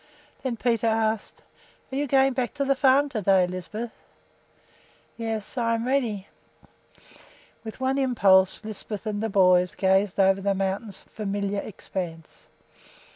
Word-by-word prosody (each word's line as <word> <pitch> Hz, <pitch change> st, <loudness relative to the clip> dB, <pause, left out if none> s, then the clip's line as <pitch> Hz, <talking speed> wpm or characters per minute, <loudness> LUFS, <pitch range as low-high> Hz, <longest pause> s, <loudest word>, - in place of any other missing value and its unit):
Then 250 Hz, -3 st, -3 dB
Peter 230 Hz, -1 st, +1 dB
asked, 220 Hz, -1 st, -1 dB, 0.5 s
"Are -, -, -4 dB
you 290 Hz, +1 st, -1 dB
going 270 Hz, 0 st, +3 dB
back 250 Hz, +1 st, -2 dB
to 280 Hz, -1 st, -1 dB
the 275 Hz, -, +3 dB
farm 270 Hz, +2 st, +4 dB
to 225 Hz, -6 st, -3 dB
day, 190 Hz, -1 st, +4 dB
Lisbeth?" 185 Hz, +6 st, -6 dB, 1.2 s
"Yes, 225 Hz, 0 st, -4 dB
I 230 Hz, -1 st, +1 dB
am 225 Hz, -, -2 dB
all -, -, -4 dB
ready." 230 Hz, -8 st, -1 dB, 1.4 s
With 220 Hz, +1 st, -8 dB
one 265 Hz, +1 st, 0 dB
impulse 200 Hz, -7 st, +3 dB
Lisbeth 215 Hz, 0 st, -6 dB
and 210 Hz, -1 st, -2 dB
the 225 Hz, -, -1 dB
boys 180 Hz, -2 st, +4 dB
gazed 190 Hz, 0 st, +1 dB
over 195 Hz, 0 st, +4 dB
the 200 Hz, 0 st, 0 dB
mountain's 195 Hz, +1 st, -3 dB
familiar 200 Hz, -1 st, -3 dB
expanse. 175 Hz, -5 st, -7 dB
215 Hz, 140 wpm, -25 LUFS, 195-240 Hz, 1.4 s, farm